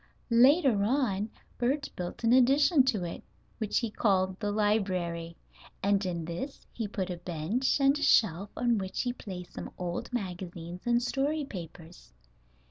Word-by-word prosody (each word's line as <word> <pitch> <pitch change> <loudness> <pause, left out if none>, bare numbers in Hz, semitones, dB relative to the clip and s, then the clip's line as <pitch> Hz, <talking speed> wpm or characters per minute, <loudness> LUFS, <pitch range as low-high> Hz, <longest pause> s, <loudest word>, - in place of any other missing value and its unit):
Later 255 - +5
on 215 -4 +1 0.3
Bert 270 +4 0
built 180 +6 -6
an 230 +1 +4
addition 275 +4 +5
to 220 -8 +1
it, 170 - -5 0.4
which 215 -3 0
he 230 -3 0
called 190 -3 +1
the 205 -2 -1
library, 185 -6 0 0.5
and 200 0 +2
in 170 -3 -3
this 175 - -6
he 225 -3 -3
put 190 -2 -3
a 175 - -4
bench 175 - -1
and 275 0 +4
a - - -6
shelf 200 - +3
on 240 -3 +2
which 190 -1 -3
he 245 -1 -1
placed 185 -7 -8
some - - -6
old 175 +4 -4
magazines 180 -4 -5
and 240 0 +3
story 285 +4 0
papers. 170 - -10
205 Hz, 155 wpm, -29 LUFS, 180-245 Hz, 0.5 s, Later